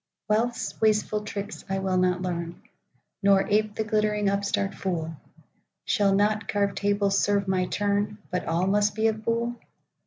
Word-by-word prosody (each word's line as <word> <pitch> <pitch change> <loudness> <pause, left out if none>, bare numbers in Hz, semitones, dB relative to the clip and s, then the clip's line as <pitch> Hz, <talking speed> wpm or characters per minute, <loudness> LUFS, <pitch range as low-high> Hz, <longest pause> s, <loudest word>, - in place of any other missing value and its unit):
Wealth's 230 +3 -1
wasteful 215 -1 +2
tricks 205 0 -6
I 195 - 0
will 190 -1 0
not 180 0 +1
learn, 170 -1 -4 0.6
Nor 195 -1 +4
ape 210 0 +1
the 220 - -1
glittering 210 -1 +1
upstart 200 0 0
fool;—Shall 185 +3 -3
not 210 +2 +1
carved 200 -1 0
tables 200 -1 +2
serve 200 -1 +1
my 185 -1 +1
turn, 205 +1 0
But 180 - -2
all 170 +3 +1
must 205 +1 +2
be 220 0 0
of 215 0 -4
buhl? 235 +1 -1
205 Hz, 150 wpm, -26 LUFS, 195-210 Hz, 0.6 s, Nor